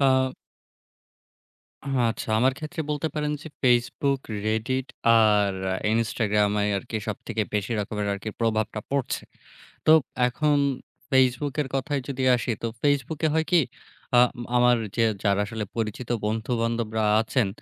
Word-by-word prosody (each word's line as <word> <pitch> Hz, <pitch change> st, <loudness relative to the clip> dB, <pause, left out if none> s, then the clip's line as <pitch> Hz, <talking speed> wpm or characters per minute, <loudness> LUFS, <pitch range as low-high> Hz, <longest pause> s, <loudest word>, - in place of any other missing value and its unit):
আ 130 Hz, -1 st, +3 dB, 1.5 s
হা 140 Hz, -, -4 dB, 0.2 s
আচ্ছা 110 Hz, -, -7 dB
আমার 130 Hz, +2 st, +3 dB
ক্ষেত্রে 160 Hz, +2 st, -5 dB
বলতে 150 Hz, +2 st, -1 dB
পারেন 150 Hz, -1 st, -1 dB
যে 160 Hz, -, -8 dB, 0.2 s
Facebook, 130 Hz, +2 st, +2 dB, 0.3 s
Reddit 125 Hz, +5 st, -1 dB, 0.3 s
আর 105 Hz, -3 st, +4 dB, 0.2 s
আ -, -, 0 dB, 0.2 s
Instagram 105 Hz, -2 st, +1 dB
ই 105 Hz, -, +1 dB
আরকি 110 Hz, +3 st, -4 dB
সবথেকে 110 Hz, +1 st, -3 dB
বেশি 105 Hz, +2 st, -1 dB
রকমের 105 Hz, 0 st, -3 dB
আরকি 100 Hz, +2 st, -5 dB
প্রভাবটা 110 Hz, -1 st, 0 dB
পড়ছে। 140 Hz, -2 st, -1 dB, 0.6 s
তো -, -, +6 dB, 0.4 s
এখন 150 Hz, +4 st, +1 dB, 0.5 s
Facebook 130 Hz, +1 st, +3 dB
এর 140 Hz, -, -3 dB
কথায় 140 Hz, +2 st, -1 dB
যদি 135 Hz, -2 st, -3 dB
আসি, 120 Hz, 0 st, -2 dB
তো 115 Hz, -, +1 dB, 0.2 s
Facebook 145 Hz, +1 st, +1 dB
এ -, -, +1 dB
হয় 160 Hz, 0 st, +2 dB
কি? 175 Hz, -, +6 dB, 0.6 s
আম 125 Hz, 0 st, +6 dB, 0.3 s
আমার 125 Hz, 0 st, +5 dB, 0.2 s
যে 115 Hz, -, +4 dB, 0.2 s
যারা 100 Hz, -1 st, +2 dB
আসলে 110 Hz, 0 st, -4 dB
পরিচিত 115 Hz, +2 st, -3 dB, 0.2 s
বন্ধু-বান্ধবরা 115 Hz, 0 st, -1 dB, 0.2 s
আছেন 115 Hz, 0 st, +1 dB
120 Hz, 140 wpm, -25 LUFS, 110-135 Hz, 1.5 s, তো